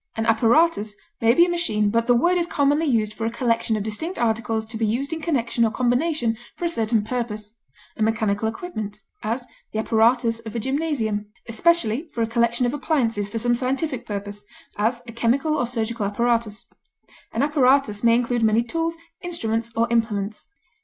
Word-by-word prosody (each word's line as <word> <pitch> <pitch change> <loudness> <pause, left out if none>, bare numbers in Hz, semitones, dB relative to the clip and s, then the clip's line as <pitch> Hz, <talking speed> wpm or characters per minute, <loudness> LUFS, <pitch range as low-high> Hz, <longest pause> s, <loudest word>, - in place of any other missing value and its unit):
An 225 - 0
apparatus 225 0 +3 0.3
may 230 +1 +4
be 345 - +7
a - - -2
machine, 215 -13 +1
but 230 +1 +1
the 245 - +5
word 345 +9 +3
is 345 -1 +1
commonly 295 0 +2
used 220 -5 +1
for 225 +1 -3
a - - -2
collection 230 -2 0
of 205 - -2
distinct 315 - -3
articles 225 -1 0
to 220 +1 -9
be 225 - -2
used 270 +8 -1
in 325 - -4
connection 245 -7 0
or 225 - +4
combination 245 0 0 0.2
for 350 - -4
a - - +2
certain 225 -7 +1
purpose 215 -2 -4 0.4
a - - -8
mechanical 215 -1 +1
equipment; 220 - -6 0.2
as, 235 +4 -2 0.3
the - - -4
apparatus 230 +1 +2
of 230 0 -9
a - - 0
gymnasium; 255 -6 -1 0.2
especially, 280 +2 +2
for 230 - +1
a - - 0
collection 235 +1 +1
of 245 - 0
appliances 255 -9 0
for 225 - -4
some 240 +2 +1
scientific 260 0 -2
purpose; 205 0 -5 0.3
as, 235 +4 0
a - - -6
chemical 255 +7 +1
or 245 - 0
surgical 230 -3 -2
apparatus; 230 0 0 0.7
an 230 - 0
apparatus 270 -7 +3
may 230 0 +5
include 240 0 0
many 220 +1 +3
tools, 330 +6 -2 0.2
instruments, 230 - -2
or 230 - +3
implements. 215 -3 -1
230 Hz, 180 wpm, -23 LUFS, 220-270 Hz, 0.7 s, be